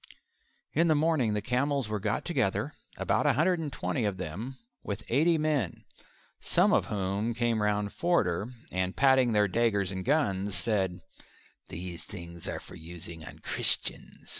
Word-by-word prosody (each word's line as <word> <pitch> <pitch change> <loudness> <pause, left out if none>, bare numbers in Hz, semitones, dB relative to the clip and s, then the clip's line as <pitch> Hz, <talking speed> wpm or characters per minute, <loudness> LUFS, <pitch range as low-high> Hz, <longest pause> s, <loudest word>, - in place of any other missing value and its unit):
In 165 +3 +3
the 155 - +4
morning 145 -8 +2
the 105 - -2
camels 135 +2 0
were 105 0 -2
got - - -1
together - - 0 0.2
about - - +1
a - - +5
hundred 175 +4 +2
and 155 -3 -4
twenty 130 - -2
of 100 -3 -1
them 100 +10 -5 0.2
with 100 +2 -5
eighty 160 +7 +3
men, 150 - -1 0.5
some - - +3
of - - +3
whom 100 +3 -1
came 120 -2 +1
round 105 -1 0
Forder, 115 - +1 0.2
and 95 0 -2
patting 130 -3 +4
their 105 -1 +4
daggers 100 -2 +1
and 95 -1 -4
guns 100 -9 +1
said, 95 -6 0 0.7
"These 85 0 -7
things 85 -3 -8
are - - -3
for - - -13
using 85 0 -9
on 65 - -10
Christians. - - +2
105 Hz, 160 wpm, -29 LUFS, 95-135 Hz, 0.7 s, a